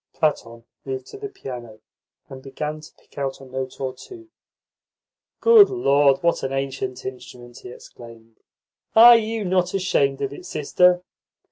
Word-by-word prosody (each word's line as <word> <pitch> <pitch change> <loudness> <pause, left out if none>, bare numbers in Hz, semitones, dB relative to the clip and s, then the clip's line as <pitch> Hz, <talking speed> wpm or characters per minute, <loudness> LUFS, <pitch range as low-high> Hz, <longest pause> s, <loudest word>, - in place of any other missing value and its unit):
Platon 115 -7 -2 0.2
moved 130 -1 -6
to - - -10
the 415 -1 -6
piano, 120 - -10 0.5
and 130 0 -11
began 150 +3 -6
to 155 - -14
pick - - -15
out 135 -1 -3
a 135 - -13
note 130 0 -6
or 130 -1 -3
two. 340 - -14 1.1
"Good 455 -3 +7
Lord, 140 - +2
what 170 0 +1
an 135 - -3
ancient 135 -1 -4
instrument!" 125 -1 -10
he - - -11
exclaimed. 115 -2 -15 0.6
"Are 235 +2 +9
you 225 -1 -1
not 180 0 0
ashamed 140 -8 0
of 140 0 -3
it, - - -11
sister?" 180 +4 +2
135 Hz, 150 wpm, -22 LUFS, 130-180 Hz, 1.1 s, Are